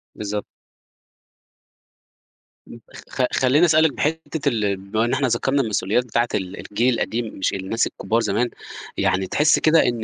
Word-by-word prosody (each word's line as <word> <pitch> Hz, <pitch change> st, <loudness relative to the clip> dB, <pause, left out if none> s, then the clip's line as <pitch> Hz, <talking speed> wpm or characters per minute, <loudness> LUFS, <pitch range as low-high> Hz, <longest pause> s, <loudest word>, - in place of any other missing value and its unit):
بالضبط. 105 Hz, 0 st, -4 dB, 2.2 s
م -, -, -11 dB, 0.2 s
خ -, -, -10 dB
خ 130 Hz, -, -1 dB
خلّيني 135 Hz, +6 st, +4 dB
أسأل 160 Hz, -1 st, +4 dB
لِك 160 Hz, -3 st, +2 dB
بحتّة 160 Hz, +1 st, -1 dB
ال 105 Hz, -4 st, -1 dB
بما 100 Hz, +4 st, -1 dB
إن 120 Hz, -, -1 dB
إحنا 130 Hz, 0 st, +1 dB
ذكرنا 135 Hz, +4 st, +1 dB
المسؤوليات 110 Hz, 0 st, 0 dB
بتاعة 120 Hz, 0 st, 0 dB
ال 95 Hz, -2 st, -4 dB
الجيل 120 Hz, +5 st, 0 dB
القديم 115 Hz, 0 st, -2 dB
مش 95 Hz, -, 0 dB
الناس 100 Hz, +4 st, -1 dB
الكبار 115 Hz, -, -1 dB
زمان، 115 Hz, +3 st, 0 dB, 0.5 s
يعني 95 Hz, 0 st, +1 dB
تحسّي 150 Hz, -, +3 dB
كده 160 Hz, +1 st, +4 dB
إن 120 Hz, -2 st, -1 dB
120 Hz, 155 wpm, -22 LUFS, 105-135 Hz, 2.2 s, خلّيني